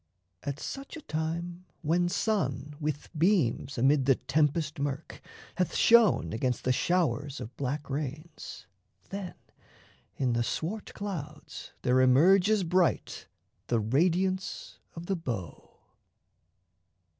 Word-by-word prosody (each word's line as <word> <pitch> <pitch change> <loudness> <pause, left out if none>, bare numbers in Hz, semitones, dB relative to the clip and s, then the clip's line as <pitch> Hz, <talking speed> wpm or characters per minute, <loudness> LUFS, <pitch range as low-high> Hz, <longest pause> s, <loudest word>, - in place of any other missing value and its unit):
At 140 0 -4
such 275 - -6
a - - -9
time 170 - -4 0.2
When 175 +3 +2
sun 150 - -1
with 150 -2 -3
beams 155 - +2
amid 135 +2 +3
the 135 - +6
tempest 150 +3 0
murk 145 +2 -4 0.4
Hath 180 -1 0
shone 225 - +5
against 125 +2 -1
the 130 - +2
showers 145 -2 0
of 115 - -8
black 140 +2 -3
rains, 145 - -6 0.4
Then 195 -2 -5 0.8
in 125 -3 +1
the 120 - +1
swart 180 - -3
clouds 155 -7 -6
there 130 0 +4
emerges 185 +10 +5
bright 180 0 +1 0.4
The 120 - +2
radiance 180 - 0 0.2
of 165 0 -7
the 195 - 0
bow. 115 - -5
155 Hz, 115 wpm, -29 LUFS, 135-180 Hz, 0.8 s, the